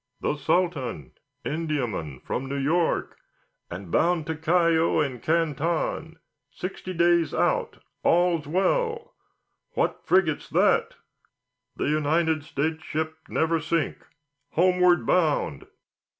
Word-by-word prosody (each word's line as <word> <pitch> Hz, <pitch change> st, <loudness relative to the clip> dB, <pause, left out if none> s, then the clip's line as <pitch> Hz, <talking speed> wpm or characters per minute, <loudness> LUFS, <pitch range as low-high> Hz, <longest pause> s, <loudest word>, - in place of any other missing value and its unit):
"The -, -, -1 dB
Sultan, 145 Hz, -, -1 dB, 0.3 s
Indiaman, 125 Hz, -, -3 dB
from 135 Hz, -, -3 dB
New 140 Hz, +1 st, -3 dB
York, 160 Hz, +5 st, 0 dB, 0.5 s
and 90 Hz, 0 st, -8 dB
bound 170 Hz, -2 st, +2 dB
to 160 Hz, +1 st, -3 dB
Callao 165 Hz, 0 st, +2 dB
and 130 Hz, -6 st, -1 dB
Canton, 160 Hz, 0 st, -1 dB, 0.3 s
sixty 185 Hz, +5 st, -6 dB
days 170 Hz, -1 st, +2 dB
out, -, -, 0 dB, 0.2 s
all 175 Hz, 0 st, +3 dB
well. 455 Hz, -, -1 dB, 0.6 s
What -, -, 0 dB
frigate's 175 Hz, -5 st, +2 dB
that?" -, -, +2 dB, 0.8 s
"The -, -, -2 dB
United 155 Hz, +1 st, +1 dB
States 160 Hz, +3 st, -2 dB
ship 160 Hz, 0 st, -3 dB
Neversink, 165 Hz, 0 st, 0 dB, 0.6 s
homeward 180 Hz, 0 st, +4 dB
bound." 155 Hz, -, +1 dB
160 Hz, 100 wpm, -26 LUFS, 145-175 Hz, 0.8 s, homeward